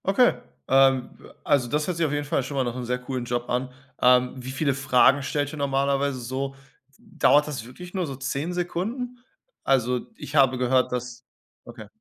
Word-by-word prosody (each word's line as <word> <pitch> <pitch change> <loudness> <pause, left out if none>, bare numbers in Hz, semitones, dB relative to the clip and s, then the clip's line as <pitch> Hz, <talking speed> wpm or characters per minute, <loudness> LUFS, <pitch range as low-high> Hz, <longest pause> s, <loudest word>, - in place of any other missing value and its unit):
Okay, 220 +6 +4 0.3
ähm, 135 -1 +4 0.3
also 130 -4 +2
das 150 +3 0
hört 180 -1 -3
sich 165 - +2
auf 150 - -1
jeden 145 0 -2
Fall 145 - 0
schon 140 +2 -6
mal 135 - +2
nach 120 -1 -3
'nem 125 0 -5
sehr 125 +1 -1
coolen 125 0 -5
Job 120 0 -3
an. 125 +1 -1 0.3
Ähm, 125 0 +4
wie 130 0 -7
viele 140 +1 0
Fragen 135 +1 +4
stellt 145 +1 -2
ihr - - -6
normalerweise 140 -1 0
so? 130 +3 -4 0.4
Dauert 170 -9 +2
das 130 -6 -5
wirklich 175 +9 -11
nur 185 -4 -1
so 135 - -5
10 140 +5 -3
Sekunden? 225 +8 -3 0.4
Also 125 -2 +1
ich 145 - -8
habe 135 -3 +4
gehört, 125 +1 +2
dass 125 0 -5 0.4
Okay. - - -11
135 Hz, 190 wpm, -25 LUFS, 125-150 Hz, 0.4 s, Okay